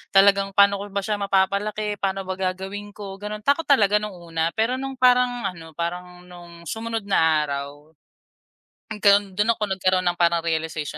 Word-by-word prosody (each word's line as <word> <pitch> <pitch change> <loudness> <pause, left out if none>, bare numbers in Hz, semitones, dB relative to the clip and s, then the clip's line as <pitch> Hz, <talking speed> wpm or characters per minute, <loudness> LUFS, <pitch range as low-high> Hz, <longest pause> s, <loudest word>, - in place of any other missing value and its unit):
Talagang 195 0 +4
paano 200 0 +5
ko 200 - -6
ba 200 0 -3
siya 210 +1 -2
mapapalaki, 200 +2 0
paano 195 0 -2
ba 185 0 -5
gagawin 190 +2 -4
ko, 195 -2 -8
gano'n. 210 +1 -6
Takot 285 +7 +1
talaga 210 -7 +4
nung 210 -2 -6
una, 165 -2 -2
pero 240 +4 0
no'ng 270 0 -5
parang 250 -1 +3
ano, 165 -3 -13
parang 180 +1 -5
no'ng 175 -1 -13
sumunod 225 +6 -4
na 160 -6 +2
araw. 140 +1 -6 1.0
Nagkaro'n 200 -2 +3
dun 215 +3 +3
ako 220 - -5
nagkaroon 185 -1 +1
ng 175 - -4
parang 170 -1 +2
realization 160 -2 -3
195 Hz, 170 wpm, -23 LUFS, 175-210 Hz, 1.0 s, paano